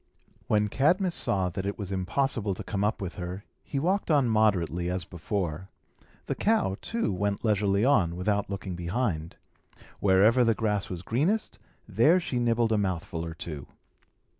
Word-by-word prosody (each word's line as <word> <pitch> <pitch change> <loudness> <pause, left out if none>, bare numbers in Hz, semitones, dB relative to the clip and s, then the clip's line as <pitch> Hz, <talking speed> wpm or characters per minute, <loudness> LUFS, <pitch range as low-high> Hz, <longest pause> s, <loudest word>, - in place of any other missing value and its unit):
When 105 0 +2
Cadmus 175 - +2
saw 95 - 0
that 95 +2 -4
it 100 +1 -3
was 100 -2 -5
impossible 100 +2 0
to - - -7
come 100 -1 -2
up 105 0 0
with 90 - -6
her, 90 +2 -5 0.2
he 140 - -5
walked 185 +8 0
on 145 -5 +4
moderately, 90 -6 +2
as 90 -2 -2
before. 90 0 -4 0.6
The - - -1
cow, 210 - +1
too, 230 - -1
went 100 +5 -1
leisurely 100 0 +2
on, 90 -12 +3
without 100 +3 0
looking 95 -2 -4
behind. 85 -2 -2 0.6
Wherever 105 +6 +5
the 115 -2 +3
grass 105 -3 -1
was 90 -1 -6
greenest, 165 - 0 0.3
there 120 - +4
she 135 -8 -2
nibbled 115 -1 +2
a 110 - +3
mouthful 85 -4 -2
or 85 -1 -6
two. 75 -4 -7
100 Hz, 165 wpm, -28 LUFS, 90-120 Hz, 0.6 s, Wherever